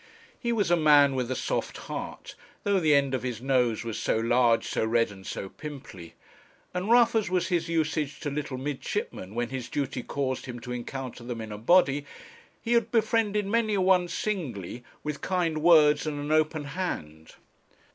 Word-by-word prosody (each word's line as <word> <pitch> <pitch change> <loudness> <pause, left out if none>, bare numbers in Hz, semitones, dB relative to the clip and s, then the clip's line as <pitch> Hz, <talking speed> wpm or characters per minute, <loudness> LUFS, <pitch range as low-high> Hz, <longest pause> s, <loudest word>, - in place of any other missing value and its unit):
He 235 - -1
was 205 -6 +1
a - - +6
man 145 -3 +5
with 125 -2 -2
a 130 - -1
soft - - -2
heart, - - -7 0.3
though 200 -1 +2
the 155 -4 +4
end 140 -1 +2
of 130 - 0
his 125 -3 -4
nose 125 -3 +1
was 115 -2 -4
so - - +1
large, 115 0 +3
so - - -1
red, 115 0 +2
and 95 -1 -12
so 95 - -4
pimply; 130 - -10 0.6
and 180 +3 -2
rough 235 -1 +6
as 220 -5 +1
was 180 0 0
his 170 -2 0
usage 155 -3 -1
to 145 - -3
little 140 -2 -3
midshipmen 130 -7 -4
when 120 0 -1
his 130 -2 -5
duty 135 -3 -2
caused 130 0 -3
him 120 -1 -6
to 125 - -7
encounter 125 0 -6
them 120 -1 -5
in 110 -1 -6
a 105 - -5
body, 145 +2 +4 0.6
he 235 - 0
had 230 -1 +3
befriended 220 -2 +1
many 220 +1 +1
a 195 - +1
one 185 -1 +4
singly 130 - -4 0.2
with 150 -1 -4
kind 175 -4 0
words 155 -3 +5
and 145 -1 -3
an 145 +1 -4
open 155 0 +2
hand. 135 - -5
145 Hz, 185 wpm, -27 LUFS, 125-180 Hz, 0.6 s, a